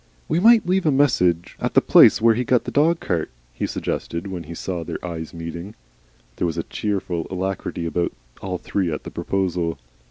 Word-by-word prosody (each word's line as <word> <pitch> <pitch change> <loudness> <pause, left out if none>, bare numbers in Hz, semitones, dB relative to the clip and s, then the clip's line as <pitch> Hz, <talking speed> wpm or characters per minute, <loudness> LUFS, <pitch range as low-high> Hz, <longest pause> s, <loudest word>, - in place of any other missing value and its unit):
"We 165 - +1
might 225 +3 +6
leave 185 -1 +1
a - - +5
message 90 - +2
at - - -2
the - - +9
place - - +6
where 115 +1 +5
he 120 +3 -1
got 125 -1 +2
the - - -5
dog 165 +3 +3
cart," 85 -3 -2 0.2
he - - -2
suggested, 85 +2 -3
when 90 -4 -5
he 85 +2 -8
saw 90 0 -4
their - - -5
eyes 80 -2 -5
meeting. 85 +3 -7 0.6
There 90 - 0
was 85 - -3
a 85 - -1
cheerful 95 -5 -3
alacrity 95 -2 -3
about 85 +1 -1 0.3
all 95 -1 -3
three 90 -1 -2
at 75 - -4
the - - -8
proposal. 90 -4 -1
90 Hz, 195 wpm, -22 LUFS, 85-115 Hz, 0.6 s, the